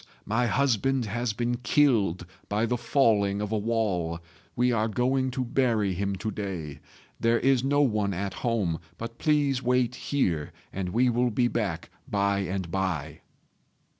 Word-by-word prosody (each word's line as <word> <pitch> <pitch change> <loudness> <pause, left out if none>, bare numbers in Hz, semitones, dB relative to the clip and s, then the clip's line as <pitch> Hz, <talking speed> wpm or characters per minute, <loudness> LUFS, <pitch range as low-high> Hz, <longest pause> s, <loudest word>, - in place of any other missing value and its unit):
my 115 +3 +1
husband 135 +1 +1
has 120 +3 -1
been 120 +3 -1
killed 115 - +2 0.2
by 105 +3 +1
the 120 +2 0
falling 110 -5 +2
of 105 0 -3
a 110 - +1
wall. 100 -7 -1 0.4
We 125 +1 +2
are 110 -2 +1
going 130 +4 +1
to 130 - 0
bury 115 -6 +1
him 100 +2 -2
to 110 +3 -3
day. 90 -8 -5 0.4
There 115 +1 +3
is 130 -1 +2
no 145 +2 +3
one 105 -6 +1
at 95 +1 -3
home; 105 -9 0 0.2
but 115 +1 -7
please 145 -4 +2
wait 125 -1 +2
here, 85 - -1 0.2
and 95 -1 -3
we 120 +5 +2
will 120 +1 +2
be 120 +2 +2
back 100 -9 -3 0.2
by 100 -1 +1
and 95 -2 -3
by." 85 -6 -2
110 Hz, 160 wpm, -27 LUFS, 100-125 Hz, 0.4 s, There